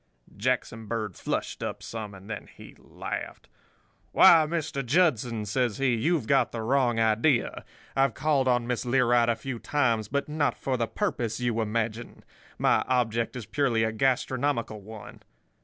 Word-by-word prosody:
"Jackson 115 Hz, -1 st, -2 dB
Bird 110 Hz, -5 st, -3 dB
flushed -, -, -3 dB
up -, -, -4 dB
some, 105 Hz, -3 st, -6 dB
and 95 Hz, +1 st, -13 dB
then 110 Hz, -2 st, -6 dB
he -, -, -13 dB
laughed. -, -, -7 dB, 0.7 s
"'Why, 160 Hz, -2 st, +7 dB
Mr. 155 Hz, -4 st, -2 dB
Judson,' 125 Hz, -6 st, +1 dB
says 120 Hz, +1 st, 0 dB
he, 135 Hz, -2 st, +2 dB
'you've 145 Hz, +4 st, +1 dB
got 135 Hz, +1 st, +2 dB
the 115 Hz, -1 st, -4 dB
wrong 120 Hz, -1 st, +2 dB
idea. 115 Hz, +4 st, +2 dB, 0.3 s
I've 135 Hz, -3 st, +2 dB
called 140 Hz, -2 st, +1 dB
on 120 Hz, -1 st, +2 dB
Miss 125 Hz, -1 st, -2 dB
Learight 120 Hz, -2 st, +3 dB
a 115 Hz, -, +2 dB
few 130 Hz, -1 st, -6 dB
times; 115 Hz, -8 st, 0 dB
but 140 Hz, +5 st, -2 dB
not 150 Hz, -1 st, 0 dB
for 130 Hz, -, -2 dB
the 115 Hz, -2 st, -1 dB
purpose 120 Hz, -, -2 dB
you 120 Hz, -2 st, 0 dB
imagine. 110 Hz, +1 st, -3 dB, 0.3 s
My -, -, +3 dB
object 115 Hz, -2 st, 0 dB
is 120 Hz, -4 st, -6 dB
purely 120 Hz, -1 st, +1 dB
a 110 Hz, -, 0 dB
gastronomical 130 Hz, -2 st, 0 dB
one. 105 Hz, 0 st, -11 dB
120 Hz, 155 wpm, -27 LUFS, 110-135 Hz, 0.7 s, Why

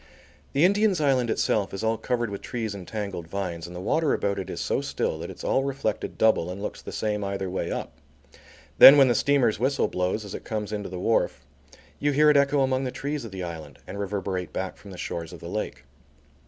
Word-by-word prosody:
The 145 Hz, +5 st, +4 dB
Indian's 200 Hz, -1 st, +3 dB
Island 130 Hz, -5 st, +2 dB
itself 105 Hz, -3 st, 0 dB
is 95 Hz, -, -5 dB
all 110 Hz, 0 st, +2 dB
covered 120 Hz, -1 st, -2 dB
with 100 Hz, -, -5 dB
trees 115 Hz, -4 st, -4 dB
and 95 Hz, -3 st, -9 dB
tangled 100 Hz, -6 st, -5 dB
vines, 85 Hz, -3 st, -4 dB
and 90 Hz, -, -10 dB
the -, -, -5 dB
water 155 Hz, -, +1 dB
about 100 Hz, -1 st, -1 dB
it 95 Hz, -, -5 dB
is -, -, -5 dB
so -, -, 0 dB
still -, -, -2 dB
that -, -, -6 dB
it's -, -, -9 dB
all 135 Hz, -, +2 dB
reflected 135 Hz, -6 st, -3 dB
double 110 Hz, -6 st, +3 dB
and 90 Hz, +2 st, -6 dB
looks 105 Hz, -, -5 dB
the -, -, -8 dB
same 105 Hz, -1 st, -2 dB
either 95 Hz, -1 st, -3 dB
way 95 Hz, -, -2 dB
up. -, -, -4 dB, 0.9 s
Then 140 Hz, -, +12 dB
when 135 Hz, -2 st, +6 dB
the -, -, +4 dB
steamer's 125 Hz, -4 st, +2 dB
whistle 135 Hz, +4 st, +1 dB
blows 90 Hz, +4 st, -1 dB
as 100 Hz, -, -8 dB
it -, -, -6 dB
comes 105 Hz, -2 st, -4 dB
into 105 Hz, -2 st, -4 dB
the 90 Hz, -, -6 dB
wharf, 110 Hz, +5 st, 0 dB, 0.5 s
you 145 Hz, 0 st, +1 dB
hear 150 Hz, +2 st, +6 dB
it 145 Hz, -, +4 dB
echo 140 Hz, 0 st, +3 dB
among 130 Hz, 0 st, +1 dB
the 130 Hz, -, -1 dB
trees 145 Hz, -1 st, -4 dB
of 110 Hz, -, -8 dB
the 95 Hz, -1 st, -5 dB
island, 80 Hz, -4 st, -7 dB
and 100 Hz, -, -7 dB
reverberate 95 Hz, -2 st, -3 dB
back 95 Hz, 0 st, -4 dB
from 100 Hz, -, -14 dB
the 95 Hz, -, -9 dB
shores 85 Hz, -2 st, -5 dB
of -, -, -9 dB
the -, -, -8 dB
lake. -, -, -4 dB
105 Hz, 230 wpm, -26 LUFS, 95-135 Hz, 0.9 s, Then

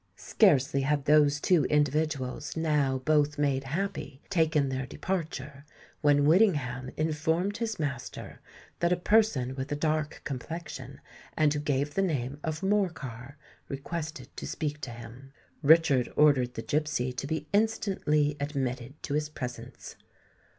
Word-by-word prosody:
Scarcely 140 Hz, -, +3 dB
had 140 Hz, 0 st, 0 dB
those 150 Hz, -1 st, +4 dB
two 165 Hz, -3 st, +3 dB
individuals, 150 Hz, -2 st, 0 dB
now 150 Hz, -4 st, +1 dB
both 150 Hz, -1 st, +2 dB
made 140 Hz, -2 st, 0 dB
happy, 155 Hz, -2 st, -4 dB
taken 160 Hz, -6 st, +2 dB
their 130 Hz, 0 st, -3 dB
departure, 150 Hz, -5 st, -4 dB, 0.4 s
when 145 Hz, -1 st, +4 dB
Whittingham 145 Hz, -, +3 dB
informed 160 Hz, +6 st, 0 dB
his 225 Hz, -2 st, -2 dB
master 140 Hz, -5 st, -5 dB, 0.4 s
that 170 Hz, 0 st, +2 dB
a -, -, +5 dB
person 180 Hz, -, +2 dB
with 130 Hz, +1 st, -5 dB
a -, -, +1 dB
dark 155 Hz, 0 st, -1 dB
complexion, 155 Hz, +5 st, -6 dB, 0.4 s
and 150 Hz, -2 st, +4 dB
who 150 Hz, -, -2 dB
gave 145 Hz, 0 st, -1 dB
the 195 Hz, -, +1 dB
name 145 Hz, -6 st, -1 dB
of 155 Hz, +1 st, -3 dB
Morcar, 150 Hz, -, -2 dB, 0.3 s
requested 140 Hz, -1 st, -6 dB
to -, -, -5 dB
speak 150 Hz, -1 st, -3 dB
to 130 Hz, -, -5 dB
him. 120 Hz, +3 st, -11 dB, 0.3 s
Richard 145 Hz, -4 st, +5 dB
ordered 135 Hz, -5 st, +4 dB
the 115 Hz, -, -4 dB
gipsy 145 Hz, -4 st, -1 dB
to 125 Hz, +2 st, -4 dB
be 155 Hz, 0 st, -3 dB
instantly 190 Hz, -9 st, +1 dB
admitted 135 Hz, -2 st, -3 dB
to 140 Hz, -, -3 dB
his 150 Hz, 0 st, 0 dB
presence. 125 Hz, -5 st, -8 dB
150 Hz, 135 wpm, -29 LUFS, 135-160 Hz, 0.4 s, a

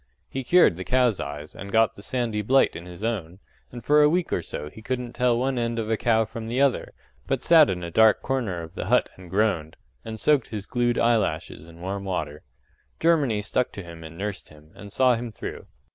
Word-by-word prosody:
He 135 Hz, -, -5 dB
cured 170 Hz, -, +5 dB
the 95 Hz, -, -5 dB
cows' 125 Hz, -2 st, +2 dB
eyes 75 Hz, +2 st, -6 dB
and 100 Hz, +1 st, -8 dB
got 110 Hz, 0 st, +3 dB
the -, -, -13 dB
sandy 115 Hz, -2 st, -2 dB
blight 130 Hz, +6 st, +3 dB
in 85 Hz, +2 st, -8 dB
his 90 Hz, +3 st, -10 dB
own, 95 Hz, -7 st, -3 dB, 0.3 s
and 120 Hz, -1 st, -9 dB
for 150 Hz, +1 st, +5 dB
a 150 Hz, -, +6 dB
week 175 Hz, +1 st, 0 dB
or -, -, 0 dB
so 75 Hz, -, -6 dB
be 110 Hz, -, -12 dB
couldn't 125 Hz, +1 st, -4 dB
tell 125 Hz, -1 st, +2 dB
one 130 Hz, +1 st, 0 dB
end 115 Hz, 0 st, -1 dB
of 110 Hz, -1 st, -2 dB
a -, -, +3 dB
cow 110 Hz, 0 st, +2 dB
from 115 Hz, 0 st, -7 dB
the 120 Hz, +3 st, -2 dB
other, 140 Hz, -2 st, +1 dB, 0.3 s
but -, -, -1 dB
sat 160 Hz, -3 st, +6 dB
in 90 Hz, -1 st, -3 dB
a 85 Hz, -, -5 dB
dark 110 Hz, +4 st, +4 dB
corner 115 Hz, -10 st, -2 dB
of 80 Hz, -, -11 dB
the -, -, -5 dB
hut -, -, +3 dB
and 90 Hz, -2 st, -13 dB
groaned, 95 Hz, -5 st, 0 dB, 0.3 s
and 110 Hz, -1 st, -7 dB
soaked 145 Hz, -2 st, +3 dB
his 105 Hz, -3 st, -6 dB
glued 120 Hz, +1 st, 0 dB
eyelashes 105 Hz, -9 st, 0 dB
in 85 Hz, 0 st, -14 dB
warm 100 Hz, +2 st, -4 dB
water. 90 Hz, -6 st, -4 dB, 0.6 s
Germany 140 Hz, -11 st, +2 dB
stuck 125 Hz, +4 st, -1 dB
to 100 Hz, -, -7 dB
him 85 Hz, -1 st, -11 dB
and 80 Hz, +1 st, -10 dB
nursed 100 Hz, +1 st, -5 dB
him, 75 Hz, +1 st, -18 dB
and 100 Hz, -1 st, -11 dB
saw 130 Hz, +3 st, +4 dB
him 120 Hz, 0 st, -3 dB
through. 110 Hz, -, -8 dB
110 Hz, 225 wpm, -25 LUFS, 90-125 Hz, 0.6 s, a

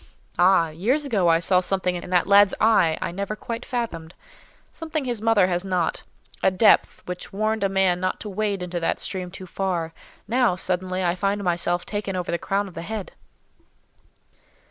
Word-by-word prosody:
Ah! 175 Hz, -2 st, +5 dB
years 230 Hz, -, 0 dB
ago 205 Hz, -10 st, +1 dB
I 165 Hz, -1 st, +5 dB
saw 180 Hz, +2 st, +3 dB
something 185 Hz, 0 st, -1 dB
in 175 Hz, 0 st, -6 dB
that 180 Hz, -1 st, +2 dB
lad's 200 Hz, 0 st, +5 dB
eye 190 Hz, -8 st, +4 dB
I -, -, -3 dB
never 200 Hz, +4 st, -4 dB
quite 230 Hz, +2 st, -6 dB
fathomed—something 240 Hz, -, -6 dB
his 240 Hz, -4 st, -3 dB
mother 225 Hz, -4 st, +4 dB
has 180 Hz, -1 st, -1 dB
not—a 185 Hz, 0 st, -2 dB
depth 190 Hz, +4 st, +3 dB
which 180 Hz, 0 st, -6 dB
warned 215 Hz, +1 st, -1 dB
a 195 Hz, -, +2 dB
man 190 Hz, -2 st, +2 dB
not 185 Hz, 0 st, -2 dB
to 210 Hz, -, -5 dB
wade 200 Hz, -1 st, -2 dB
into 175 Hz, -1 st, -3 dB
that 165 Hz, -, -1 dB
stream 185 Hz, -2 st, -2 dB
too 185 Hz, +1 st, -9 dB
far; 175 Hz, -3 st, -3 dB, 0.3 s
now, 235 Hz, -4 st, +2 dB
suddenly, 185 Hz, 0 st, -2 dB
I 175 Hz, -1 st, +2 dB
find 200 Hz, +2 st, -1 dB
myself 175 Hz, 0 st, 0 dB
taken 205 Hz, -2 st, -4 dB
over 180 Hz, -1 st, -3 dB
the 170 Hz, -, -1 dB
crown 200 Hz, +1 st, -1 dB
of 190 Hz, -, -12 dB
the 165 Hz, -, -6 dB
head." 210 Hz, +2 st, -5 dB
190 Hz, 175 wpm, -24 LUFS, 180-210 Hz, 0.3 s, Ah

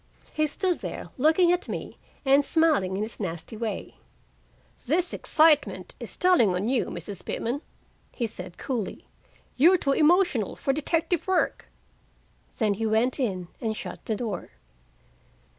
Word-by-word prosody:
He 310 Hz, 0 st, +1 dB
stood 360 Hz, +3 st, -1 dB
there -, -, -6 dB
looking 320 Hz, +6 st, +4 dB
at 355 Hz, 0 st, -1 dB
me -, -, -6 dB, 0.3 s
and 275 Hz, +2 st, +5 dB
smiling 285 Hz, -, +2 dB
in 205 Hz, -, -1 dB
his 220 Hz, -, -6 dB
nasty 175 Hz, +1 st, -5 dB
way. 220 Hz, -1 st, -5 dB, 0.9 s
"This 350 Hz, +6 st, +1 dB
excitement 305 Hz, -2 st, +3 dB
is -, -, -5 dB
telling 340 Hz, -, +4 dB
on 190 Hz, +4 st, -1 dB
you, 255 Hz, -1 st, +1 dB
Mrs. 200 Hz, -3 st, -7 dB
Pitman," 250 Hz, +5 st, -3 dB, 0.5 s
he 240 Hz, -, -2 dB
said 180 Hz, -5 st, -7 dB
coolly. 240 Hz, -8 st, -4 dB, 0.5 s
"You're 340 Hz, +8 st, +6 dB
too 280 Hz, -5 st, 0 dB
emotional 305 Hz, -, +3 dB
for 270 Hz, -, 0 dB
detective 325 Hz, +4 st, -1 dB
work." 375 Hz, -1 st, 0 dB, 0.9 s
Then 215 Hz, -3 st, +2 dB
he 220 Hz, +3 st, -2 dB
went 225 Hz, +6 st, +1 dB
in 185 Hz, -9 st, -2 dB
and 220 Hz, -2 st, -1 dB
shut -, -, -7 dB
the 220 Hz, -, -1 dB
door. 210 Hz, -4 st, -4 dB
260 Hz, 140 wpm, -26 LUFS, 215-320 Hz, 0.9 s, You're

